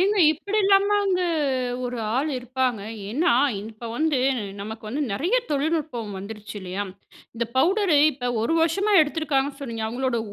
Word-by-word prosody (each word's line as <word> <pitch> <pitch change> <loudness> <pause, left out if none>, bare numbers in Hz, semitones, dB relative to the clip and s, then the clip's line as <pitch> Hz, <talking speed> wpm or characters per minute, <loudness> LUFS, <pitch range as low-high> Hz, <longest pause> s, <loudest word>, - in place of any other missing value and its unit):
ஏங்க 400 +2 +2
இப்பிடிலாமாங்க 400 +1 +2 0.7
ஒரு 245 0 -3 0.2
ஆளு 295 +3 0
இருப்பாங்க. 250 -3 -1 0.3
ஏன்னா, 265 +4 +2 0.3
இப்ப 225 +2 -8
வந்து 305 -1 +1 0.4
நமக்கு 220 +2 -7
வந்து 285 +6 -2
நிறையா 350 - +1
தொழில்நுட்பம் 290 -7 -1
வந்துருச்சு 210 +2 -8
இல்லயா! 190 +2 -4 0.5
இந்த 235 +1 -1
பவுடரு 355 +1 +3
இப்ப 245 -2 -3
1 325 +8 +1
வருஷமா 390 +6 +2
எடுத்துருக்காங்கன்னு 290 -2 0
சொன்னீங்க. 230 -5 -5
அவுங்களோட 245 +1 -1
275 Hz, 130 wpm, -24 LUFS, 230-335 Hz, 0.7 s, பவுடரு